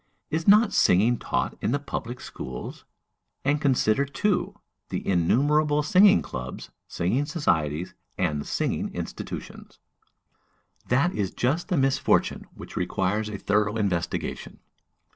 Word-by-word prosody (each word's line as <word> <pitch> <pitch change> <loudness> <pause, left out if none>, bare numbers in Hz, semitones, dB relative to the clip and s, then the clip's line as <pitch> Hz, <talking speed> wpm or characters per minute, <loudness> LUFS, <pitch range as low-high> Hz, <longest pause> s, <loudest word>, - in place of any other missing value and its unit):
"Is 160 +1 -2
not 210 +2 +6
singing 110 +6 +4
taught - - -2
in 110 - 0
the - - +2
public 125 -3 -5
schools? 65 -2 -8 0.6
And 145 +1 +1
consider, 135 -3 +2
too, 140 +8 -1 0.3
the - - -4
innumerable 145 - +2
singing 195 +6 +5
clubs, 65 0 -7 0.2
singing 120 +12 -1
societies, 85 - -1 0.2
and 75 -6 0
singing - - -1
institutions!" - - -7 1.1
That 140 +9 +2
is 100 -3 -1
just 140 - -1
the 180 -5 0
misfortune 135 -1 +1
which - - -11
requires 95 +4 -1
a 105 - -5
thorough 105 +2 +1
investigation. 95 -6 -2
120 Hz, 120 wpm, -26 LUFS, 95-150 Hz, 1.1 s, not